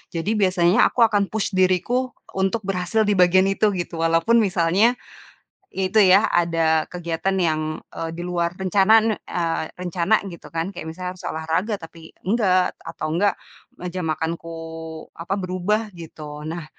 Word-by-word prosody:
Jadi, 205 +6 -1
biasanya 185 -1 +4
aku 240 - +2
akan 205 -3 +3
push 220 0 -2
diriku 190 +7 +1 0.2
untuk 195 +3 -1
berhasil 195 +3 0
di 210 - +1
bagian 185 +1 +5
itu, 205 0 +1
gitu, 175 -2 -4
walaupun 165 +8 +3
misalnya, 195 +3 +3 0.8
ya 190 - -2
itu, 220 - 0
ya 195 +4 +5
ada 165 -2 +2
kegiatan 175 +2 -2
yang, 155 -2 +1 0.3
eee, 165 - -4
di - - -4
luar 170 -1 -1
rencanaan 205 +4 +3
eee, 165 -2 -2
rencana 180 +3 0
gitu 170 -4 -11
kan, 165 +2 -2
kayak 175 - -7
misalnya, 180 +2 -5
harus - - -11
olahraga, 165 +7 -1
tapi 165 0 -12
enggak, 185 -3 +2
atau 165 -1 -5
enggak, 200 +4 +2 0.5
meja 180 +1 -4
makanku, 165 +1 -3 0.6
apa, 170 +4 -3
berubah, 195 +4 -1
gitu. 150 -2 -9
Nah, 165 +1 -5
180 Hz, 150 wpm, -22 LUFS, 165-200 Hz, 0.8 s, bagian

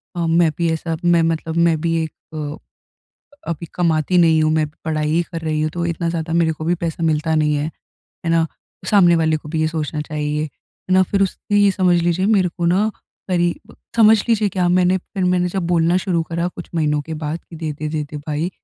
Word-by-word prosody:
अ, 170 -1 -1
मैं 165 0 +3
भी 170 -1 +1
ऐसा 160 0 -2
मैं 175 -1 +4
मतलब 165 0 -1
मैं 160 -1 0
भी 165 0 0
एक 160 - -5 0.2
अ, 150 0 -4 0.9
अभी 170 +1 -4
कमाती 170 0 +2
नहीं 160 -2 +4
हूँ, 155 - +2
मैं 155 -1 +2 0.2
पढ़ाई 155 -1 -1
ही 170 +2 +2
कर 165 - -4
रही 155 -1 -1
हूँ, 155 - 0
तो 170 +1 -2
इतना 170 0 -2
ज़्यादा 165 -1 -3
मेरे 165 -1 +2
को 155 0 -7
भी 170 +2 +2
पैसा 165 0 -3
मिलता 160 0 +1
नहीं 150 -1 +2
है। 145 +2 -1 0.6
है - - +1
ना, 165 -1 +3 0.4
सामने 175 -5 +5
वाले 160 -1 +2
को 150 - -10
भी 160 0 -2
ये 155 - +2
सोचना 155 -1 -3
चाहिए। 150 0 -2
है 155 +4 -9
ना, 185 - +6
फिर 195 +2 0
उससे 195 +2 -1
ये 205 -1 +5
समझ 185 -2 +2
लीजिए 175 +2 +1
मेरे 200 -4 +3
को 170 0 -5
ना, 190 +5 +3 0.4
क़रीब 175 -2 -1 0.2
समझ 220 -1 +7
लीजिए 220 -3 +3
क्या 180 -2 0
मैंने 180 +1 +3
फिर 185 +1 -4
मैंने 180 0 +2
जब 190 0 -2
बोलना 170 0 +2
शुरू 175 -3 0
करा 170 +1 -2
कुछ 175 -1 -10
महीनों 150 -2 +1
के 160 +2 -6
बाद 155 +1 -4
कि 165 - -12
दे, 155 -1 -3
दे 155 +1 -5
दे 155 0 -2
दे, 150 +1 -9
भाई। 150 +3 -3
165 Hz, 225 wpm, -20 LUFS, 155-175 Hz, 0.9 s, समझ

